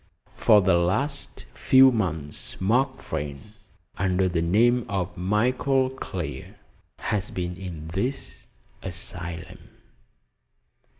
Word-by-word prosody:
For 105 -1 +5
the 95 -2 +4
last 95 +12 -2
few 130 0 +6
months 80 - -3
Mark 130 +8 +1
Vrain, 75 +9 -6 0.5
under 95 0 +2
the 85 -2 0
name 115 +8 +3
of 95 -2 -2
Michael 125 +7 +1
Clear, 130 - -6 0.4
has 105 -1 -2
been 90 -1 -4
in 85 -5 -7
this 110 +11 -3 0.3
asylum!" 85 +2 -5
95 Hz, 100 wpm, -25 LUFS, 90-120 Hz, 0.5 s, few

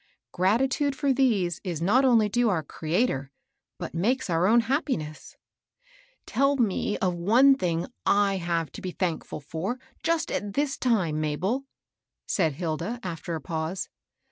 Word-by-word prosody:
Gratitude 260 +9 +1
for 275 0 +1
these 215 - +1
is 175 -5 -3
not 205 +11 +3
only 235 -5 +5
due 240 +2 +2
our 170 -6 0
Creator, 155 - -1 0.5
but - - -6
makes 215 +5 0
our 165 +2 +2
o¥ni 230 +2 +5
^^ 235 - -2 0.9
Tell 275 +1 +2
me 210 -3 0
of 185 -2 0
one 230 +11 +5
thing 170 -9 -1 0.2
I 200 -1 +3
have 170 -3 -1
to - - -9
be 185 - -4
thankful 175 -4 -3
for, 165 - -3 0.2
just 335 -1 0
at 205 -1 -3
this 285 +1 0
time, 185 -11 +1
Mabel," 185 - -1 0.6
said 165 -6 +1
Hilda, 170 - -3
after 170 -1 -4
a 160 - -5
pause. 160 +5 -3
195 Hz, 145 wpm, -26 LUFS, 165-250 Hz, 0.9 s, only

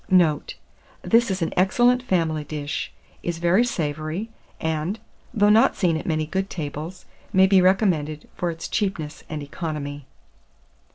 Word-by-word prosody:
Note. 175 -5 +3 0.5
This 235 0 +4
is 190 -2 -1
an 165 - -2
excellent 240 +7 +4
family 165 -9 0
dish, 150 0 -4 0.3
is 170 -1 -3
very 175 +6 +3
savoury, 160 +1 -3 0.3
and, 160 +5 -1 0.3
though 210 -3 +4
not 220 +2 +5
seen 180 -4 +2
at 160 - -4
many 155 -2 0
good 190 +5 -2
tables, 155 +3 -6 0.3
may 190 0 +6
be 190 -1 +5
recommended 180 -6 +2
for 175 - -1
its 165 0 -5
cheapness 170 -8 -2
and 155 -2 -4
economy. 145 -2 -5
170 Hz, 145 wpm, -24 LUFS, 155-190 Hz, 0.5 s, may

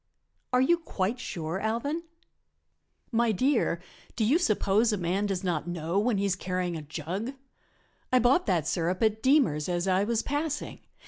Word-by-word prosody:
"Are 250 0 +4
you 340 +6 +4
quite 230 - -2
sure, 170 -6 -4
Alvan?" 235 +10 -1 1.1
"My 235 -1 +2
dear, 230 -4 +1 0.4
do 220 - +1
you 280 +10 +4
suppose 215 - +2
a 210 - 0
man 185 +3 0
does 195 -1 -2
not 175 -3 -1
know 175 +2 -1
when 220 0 +1
he 200 - 0
is 195 -2 +1
carrying 180 -1 -2
a 160 - -4
jug? 170 - -4 0.8
I 255 - +5
bought 250 +9 +3
that 175 -6 +1
sirup 175 +5 0
at 220 0 +2
Deemer's 225 - +3
as 175 +1 -1
I 190 +1 +3
was 225 +1 0
passing. 295 +1 -3
200 Hz, 170 wpm, -28 LUFS, 175-245 Hz, 1.1 s, I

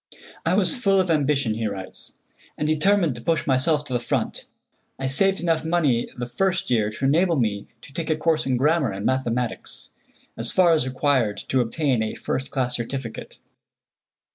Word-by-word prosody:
"I 175 - +3
was 200 +7 +2
full 195 -6 +2
of 185 -2 +1
ambition," 140 -6 +1
he 110 0 -2
writes, 95 -2 -8 0.4
"and 150 - -1
determined 165 +1 +2
to 120 - -9
push 165 +6 0
myself 145 +3 +1
to 130 - -6
the 120 - +1
front. 120 - -3 0.5
I 135 - -4
saved 195 +9 +2
enough 165 -2 +1
money 160 -8 +1
the 120 - -3
first 185 +6 -1
year 110 -4 +2
to 110 +5 -4
enable 170 +5 +3
me 105 -6 -1 0.2
to 140 - -13
take 165 +1 -4
a 155 - +1
course 155 -2 +1
in 130 -2 +1
grammar 150 0 +2
and 95 +1 -5
mathematics, 125 -2 -2 0.4
as 115 +1 -2
far 175 -3 +4
as 155 -5 +1
required 130 -5 +1
to 130 - +2
obtain 125 0 0
a 110 - -2
first 135 +2 -3
class 125 -3 0
certificate." 120 -1 -6
135 Hz, 180 wpm, -23 LUFS, 120-165 Hz, 0.5 s, far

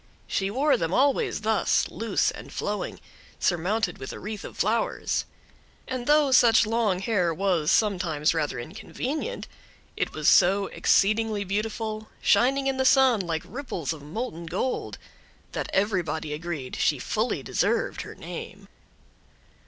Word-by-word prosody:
She 195 0 -1
wore 275 +7 +2
them 165 +1 -1
always 275 +1 +2
thus, 220 0 +2
loose 225 -3 0
and - - -10
flowing, 205 0 -3 0.4
surmounted 185 +3 0
with 130 - -6
a - - -7
wreath 210 0 -6
of - - -9
flowers; 225 +3 0 0.6
and 255 -2 -4
though 295 -2 +4
such 235 -3 +6
long 220 -4 +1
hair 185 -3 +1
was 170 -3 +1
sometimes 175 -8 +2
rather 155 -3 -1
inconvenient, 255 - -5 0.5
it - - -1
was - - -2
so 195 +3 +5
exceedingly 215 +1 +2
beautiful, 215 +2 -3
shining 265 +6 +3
in 270 -1 0
the 265 - +2
sun 260 -3 +5
like 165 -3 -3
ripples 200 - -4
of 155 - -10
molten 170 - -5
gold, 190 +9 -2 0.5
that - - -4
everybody 175 -7 0
agreed 155 -4 -5
she - - +2
fully - - -1
deserved - - 0
her - - -9
name. - - -8
205 Hz, 135 wpm, -26 LUFS, 175-235 Hz, 0.6 s, such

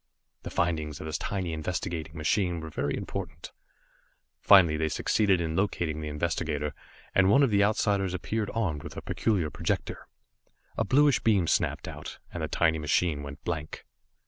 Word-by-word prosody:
The - - -6
findings 80 -3 -1
of - - -7
this 80 - -3
tiny 95 -4 -2
investigating 80 0 -4
machine 85 +2 +1
were 80 0 -7
very 70 0 -1
important. - - -6 0.9
Finally 95 -6 +6
they 80 0 0
succeeded 95 +5 +2
in 80 -1 -2
locating 85 -5 -1
the 75 - -4
investigator, 75 -1 -2 0.4
and 95 -1 +4
one 135 +8 +6
of 130 - +3
the 100 0 +4
Outsiders 100 -3 +1
appeared 105 +3 -2
armed 85 -10 -1
with - - -9
a - - -6
peculiar 95 -9 0
projector. - - -3 0.7
A - - +1
bluish 140 +4 +4
beam 100 -6 +3
snapped - - 0
out, - - -7 0.2
and 85 - -4
the 80 - -1
tiny 80 -1 +2
machine 75 0 +1
went 70 +1 -9
blank. 80 -3 -4
85 Hz, 165 wpm, -28 LUFS, 75-100 Hz, 0.9 s, Finally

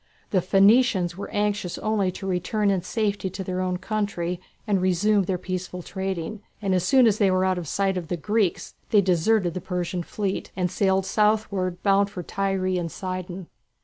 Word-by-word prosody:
The 185 - +3
Phoenicians 195 -1 +4
were 200 - -6
anxious 205 -3 -1
only 210 -4 0
to 195 - -7
return 195 +3 0
in 190 -2 +1
safety 205 0 -1
to 190 +1 -6
their 185 0 -2
own 185 -1 -1
country 185 -3 -2 0.2
and 200 -4 +1
resume 190 +2 +2
their 185 0 -1
peaceful 185 0 -5
trading, 190 +1 -4 0.2
and 195 -3 0
as 180 -2 +2
soon 255 +7 +5
as 215 -2 +3
they 200 -2 +4
were 185 0 +2
out 185 -1 +1
of 170 - -7
sight 195 +3 0
of 175 -3 -4
the 175 - -2
Greeks, 205 +3 0 0.2
they 210 -3 +5
deserted 180 0 +2
the 185 - -4
Persian 180 -1 -3
fleet, 195 +2 -3
and 180 -2 -1
sailed 190 -1 +2
southwards, 210 -4 +1
bound 200 0 +3
for 180 -3 -6
Tyre 195 +1 -1
and 180 -3 -1
Sidon. 185 -1 -5
190 Hz, 185 wpm, -25 LUFS, 180-205 Hz, 0.2 s, soon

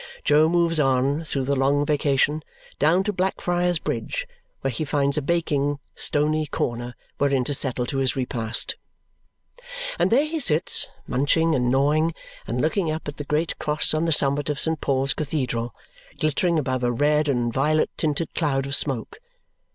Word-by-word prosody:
Jo 155 +2 +5
moves 170 -1 +2
on, 135 +2 +2
through 135 -3 -2
the 140 +1 +1
long 140 +2 +2
vacation, 145 0 +1 0.4
down 165 +6 +3
to 210 - -1
Blackfriars 180 -2 0
Bridge, - - -3 0.3
where 135 - -1
he 125 - -3
finds 140 -1 +1
a 150 - +1
baking 145 -2 0 0.2
stony 155 +1 0
corner 120 -2 -3 0.2
wherein 140 -2 +2
to 145 - -2
settle 130 -3 -1
to 135 +2 -2
his 130 -3 +1
repast. 120 -3 -1 1.2
And - - +3
there 270 +6 +4
he 320 +1 -3
sits, 160 - +2 0.2
munching 160 +5 +2
and 125 -4 +1
gnawing, 150 +5 +2 0.3
and 120 - -2
looking 160 +4 +1
up 155 0 -4
at 145 - -6
the 145 - -5
great 155 +3 -1
cross 150 +1 0
on 155 +2 +1
the 165 - +1
summit 145 -1 +2
of 145 -1 -2
St. 160 -1 0
Paul's 135 -1 +1
Cathedral, 125 -6 -3 0.4
glittering 165 +3 +1
above 130 -4 -1
a 120 - +2
red 150 +4 +2
and 120 -4 0
violet 155 +4 +1
tinted 155 +1 -2
cloud 135 -5 0
of 140 +1 0
smoke. 135 - 0
145 Hz, 165 wpm, -24 LUFS, 135-160 Hz, 1.2 s, Jo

